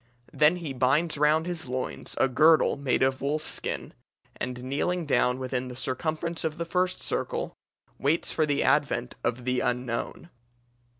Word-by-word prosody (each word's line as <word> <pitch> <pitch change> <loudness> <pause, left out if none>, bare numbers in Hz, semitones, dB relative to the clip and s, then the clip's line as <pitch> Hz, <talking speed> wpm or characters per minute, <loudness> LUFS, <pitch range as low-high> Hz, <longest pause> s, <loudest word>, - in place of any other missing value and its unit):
Then 150 +3 +5
he 165 -6 -5
binds 135 +6 +2
round 155 +2 +3
his 175 -4 -4
loins 130 +1 -4
a - - +4
girdle 155 +5 +5
made 140 -2 +1
of 130 0 +1
wolf's 150 +3 -1
skin, - - -3 0.4
and 125 0 -5
kneeling 160 +6 -1
down 125 -3 +2
within 130 -1 -3
the 125 - -7
circumference 155 +6 -2
of 155 -1 -2
the 170 - -2
first 180 +2 0
circle, - - -2 0.5
waits 145 +5 +1
for 155 -1 +1
the 145 -1 +1
advent - - +1
of 120 +1 -1
the 125 0 +1
Unknown. 125 +6 -2
140 Hz, 160 wpm, -27 LUFS, 130-160 Hz, 0.5 s, Then